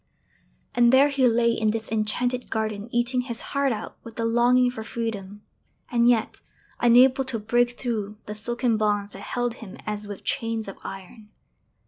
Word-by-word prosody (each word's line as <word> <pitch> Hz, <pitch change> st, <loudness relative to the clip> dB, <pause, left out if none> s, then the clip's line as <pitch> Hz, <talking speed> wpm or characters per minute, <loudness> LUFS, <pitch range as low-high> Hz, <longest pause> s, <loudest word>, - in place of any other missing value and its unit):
And 240 Hz, -1 st, +5 dB
there 270 Hz, +2 st, +6 dB
he 270 Hz, -3 st, +3 dB
lay 235 Hz, 0 st, +3 dB
in 220 Hz, -1 st, +1 dB
this 220 Hz, 0 st, -3 dB
enchanted 245 Hz, +3 st, -1 dB
garden 215 Hz, -1 st, -3 dB
eating 240 Hz, +1 st, +1 dB
his 235 Hz, -2 st, -3 dB
heart 280 Hz, -1 st, +2 dB
out 215 Hz, -, -6 dB
with 230 Hz, -1 st, -11 dB
the 230 Hz, -, -2 dB
longing 245 Hz, +2 st, +4 dB
for 225 Hz, -, -7 dB
freedom, 210 Hz, -3 st, -5 dB, 0.5 s
and 240 Hz, -1 st, +4 dB
yet 230 Hz, -3 st, +1 dB, 0.4 s
unable 250 Hz, +3 st, +5 dB
to 255 Hz, -3 st, -1 dB
break 240 Hz, +3 st, +1 dB
through 215 Hz, -4 st, -3 dB
the 210 Hz, -, -5 dB
silken 240 Hz, +2 st, -1 dB
bonds 205 Hz, -1 st, 0 dB
that -, -, -9 dB
held 245 Hz, +2 st, -2 dB
him 220 Hz, +1 st, -9 dB
as 210 Hz, -1 st, -4 dB
with 205 Hz, -2 st, -8 dB
chains 225 Hz, -1 st, -2 dB
of 195 Hz, -, -8 dB
iron! 200 Hz, +3 st, -9 dB
230 Hz, 170 wpm, -25 LUFS, 215-245 Hz, 0.5 s, there